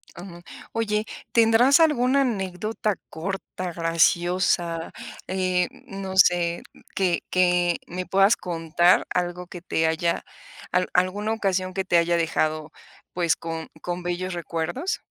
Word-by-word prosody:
Ujú. 175 -1 -10 0.3
Oye, 215 -1 0 0.3
¿tendrás 235 +6 +5
alguna 275 -4 +3
anécdota 210 -2 -2
corta, 185 +1 -5
graciosa, 170 0 +1 0.4
eh, 185 -1 0 0.2
no 195 -1 -6
sé, 175 -2 +4 0.3
que 185 -3 +1
que 180 -1 +3
me 180 +1 -5
puedas 195 +3 +4
contar 170 +1 +2
algo 180 0 -2
que 175 -2 -9
te 160 -2 0
haya 165 +1 0 0.5
al 180 0 +1
alguna 200 +5 +1
ocasión 185 -3 -1
que 190 0 -1
te 175 -2 +2
haya 170 +1 +2
dejado, 155 -1 -1 0.4
pues, 170 -2 +1
con 165 -1 -6
con 175 0 -4
bellos 175 +1 -3
recuerdos? 170 - -3
180 Hz, 125 wpm, -24 LUFS, 170-195 Hz, 0.5 s, tendrás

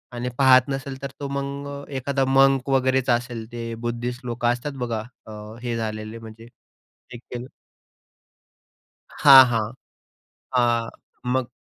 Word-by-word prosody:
आणि 120 +1 -3
पाहत 130 -1 +6
नसेल, 135 0 -5
तर 140 - -5
तो 140 - -4
मग 140 0 -4
अ, 140 0 -7
एखादा 135 +1 0
मंक 135 0 +3
वगैरेच 130 -1 +2
असेल, 120 -1 -1
ते 115 -1 -5
बुद्धिस्ट 120 +2 -4
लोकं 120 0 -2
असतात 125 +4 -5
बघा 115 -2 -3 0.2
अ, 110 - -9 0.3
हे 120 -1 -3
झालेले, 110 0 -5
म्हणजे 115 0 -12 0.7
हे - - -7
केलं 125 +1 -8 1.7
हां, 135 -3 +9
हां. 115 -3 -1 0.8
हां, 120 -2 +2 0.4
मग 130 -2 0
125 Hz, 135 wpm, -23 LUFS, 115-135 Hz, 1.7 s, हां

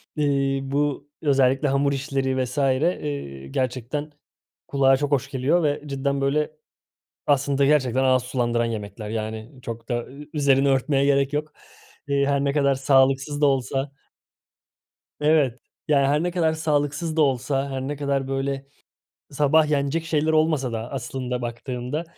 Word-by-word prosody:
eee, 140 -2 +1
bu 145 +1 -1
özellikle 135 -1 +3
hamur 140 +1 +2
işleri 135 -1 -1
vs. 125 +2 -6
eee, 140 - -1
gerçekten 130 - -3 0.6
kulağa 135 -1 +4
çok 145 +1 -2
hoş 135 -1 +1
geliyor 140 +6 +1
ve 145 -1 0
cidden 140 0 -2
böyle, 150 +3 +1 0.8
aslında 140 -1 +2
gerçekten 130 -3 +2
ağız 130 -1 +3
sulandıran 120 -2 0
yemekler 105 -1 -5
yani 110 +1 -4
çok 115 -1 -7
da 120 -1 -1
ü 145 +3 -12
üzerini 140 -2 +3
örtmeye 135 +1 +2
gerek 140 0 +2
yok. 150 +1 -2 0.5
Eee, 140 -1 +2
her 140 0 +1
ne 140 0 +1
kadar 140 -2 +2
sağlıksız 135 +2 +2
da - - +5
olsa 135 +1 0 1.3
Evet, 150 -5 +2 0.3
yani, 140 -2 +3
her 150 +3 +2
ne 175 - -1
kadar 165 -3 +1
sağlıksız 155 +1 -1
da 160 - +3
olsa, 135 0 +1
her 135 -1 -3
ne 140 +3 -3
kadar 140 -2 -1
böyle 135 0 -2 0.7
sabah 150 +2 +3
yenecek 145 +3 0
şeyler 160 -1 +1
olmasa 155 -5 +2
da 115 +1 -4
aslında 125 -1 -4
baktığında, 125 +5 -4
140 Hz, 145 wpm, -24 LUFS, 130-145 Hz, 1.3 s, da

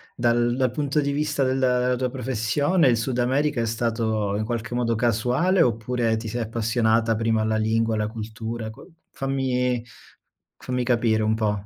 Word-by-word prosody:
dal 120 +1 +1
punto 145 +1 0
di 140 0 -1
vista 150 0 0
della 125 -1 +2
tua 125 0 -1
professione 130 - +1
il 120 -2 +3
Sud 120 +2 -2
America 135 +2 +1
è - - 0
stato 110 -3 -1
in 110 - -1
qualche 115 -1 -4
modo, 120 -1 0
casuale 125 - +2
oppure 115 -2 +1
ti 110 +1 -6
sei 120 +3 -3
appassionata 115 0 +1
prima 110 0 +1
alla 110 0 0
lingua, 110 +1 +1
alla 105 -1 0
cultura, 110 +1 -6
qua 120 - -14 0.3
fammi 125 -3 -1 0.7
fammi 125 0 -2
capire 115 -3 +2
un 110 0 +1
po'. 105 -2 -1
120 Hz, 160 wpm, -24 LUFS, 110-125 Hz, 0.7 s, il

